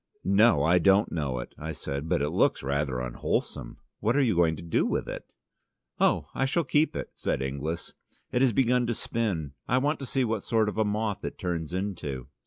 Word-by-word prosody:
"No, 100 -5 +4
I 85 +4 +4
don't 100 +3 +4
know 70 -6 -2
it," - - -6
I 80 +2 -4
said, 70 +2 -5
"but 70 - +2
it 75 - -1
looks - - +2
rather 70 -2 -1
unwholesome. 60 -1 -3 0.2
What 115 +4 +1
are 145 - +4
you 115 -7 +2
going 85 -2 +3
to 80 - -9
do 85 - +1
with - - -1
it?" - - -7 0.7
"Oh, - - +3
I 135 - +1
shall 165 +6 +1
keep 155 +1 +2
it," - - -4
said - - -2
Inglis. 70 +5 -4 0.4
"It 125 - +1
has 135 -2 +5
begun 125 +1 +2
to 120 - 0
spin: 95 -14 -2
I 125 - +2
want 145 +4 +1
to 135 - -6
see 130 +1 +1
what 110 -2 -1
sort 110 0 +1
of 105 - -4
a - - +5
moth 105 -1 -1
it - - -5
turns 85 -4 -3
into." 90 -9 -4
95 Hz, 210 wpm, -28 LUFS, 75-115 Hz, 0.7 s, has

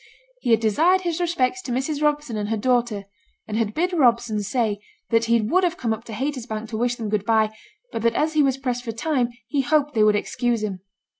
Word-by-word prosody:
He - - -3
had 225 -2 +5
desired 320 - +3
his 345 -2 -2
respects 345 -1 0
to 270 - -6
Mrs. 270 +4 -1
Robson 295 -5 0
and 210 -1 -2
her 225 - 0
daughter; 240 -3 +1 0.4
and 215 - -4
had 220 -2 -1
bid 360 +3 0
Robson 235 -7 +2
say 210 0 -1 0.3
that 230 0 +3
he 230 0 +3
would 345 - +2
have 355 0 +1
come 230 -7 0
up 225 +2 -7
to 230 - -8
Haytersbank 230 -3 -4
to 220 - -4
wish 240 +1 0
them 225 -2 -5
good 210 -1 0
by, 220 0 +2 0.4
but 225 - -3
that 230 0 +2
as 315 +1 +1
he 310 - +4
was 270 -2 +2
pressed 250 -2 -2
for 230 -2 -4
time, 250 0 0 0.2
he 285 +1 +1
hoped 295 +1 +1
they 220 - +2
would 215 0 +5
excuse 235 +1 -1
him. 195 -3 -3
240 Hz, 230 wpm, -23 LUFS, 220-295 Hz, 0.4 s, had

